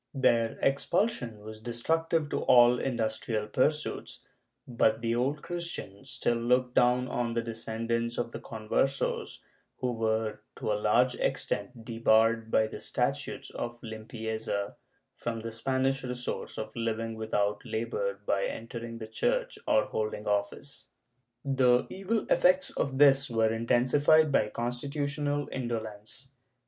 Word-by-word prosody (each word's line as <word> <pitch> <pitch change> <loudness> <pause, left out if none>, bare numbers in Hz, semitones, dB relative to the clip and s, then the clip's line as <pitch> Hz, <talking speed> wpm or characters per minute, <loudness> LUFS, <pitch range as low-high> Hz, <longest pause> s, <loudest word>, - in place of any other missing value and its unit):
Their 120 -4 +2
expulsion 135 - +1
was 110 +1 -9
destructive 160 +7 0
to - - 0
all 120 0 +6
industrial 110 -3 -1
pursuits, 150 +7 -1 0.5
but 110 -2 +2
the 115 0 0
Old 135 +5 0
Christian 170 - -5
still 125 -2 0
looked 125 +1 +2
down 125 +1 +3
on 120 -1 -2
the 115 - 0
descendants 115 +1 -2
of 120 -1 -2
the - - -6
Conversos 115 +5 -1 0.4
who 125 - -1
were 110 -1 -1
to - - -2
a - - +3
large 125 +4 +4
extent 110 +3 -2
de 115 0 -6
barred, 115 0 +4
by 110 - +4
the 110 - -7
statutes - - -2
of 120 0 -5
Limpieza, 110 -2 -4 0.4
from 115 -1 -4
the 115 +1 -5
Spanish 130 +3 0
resource 125 -1 -4
of 110 - -5
living 115 -1 -2
without 105 -2 -1
labor 100 -3 -2
by 100 -1 +1
entering 115 0 -6
the 110 - -6
Church - - -1
or 285 -3 +4
holding 105 -1 -3
office. 105 +7 -2 0.6
The 130 -3 +4
evil 200 +4 -1
effects 185 +1 +4
of 135 -1 -2
this 135 -1 +6
were 110 -1 +2
intensified 135 +7 +4
by 105 -6 +3
constitutional 145 +5 -2
indolence. 115 0 -5
120 Hz, 135 wpm, -29 LUFS, 110-135 Hz, 0.6 s, all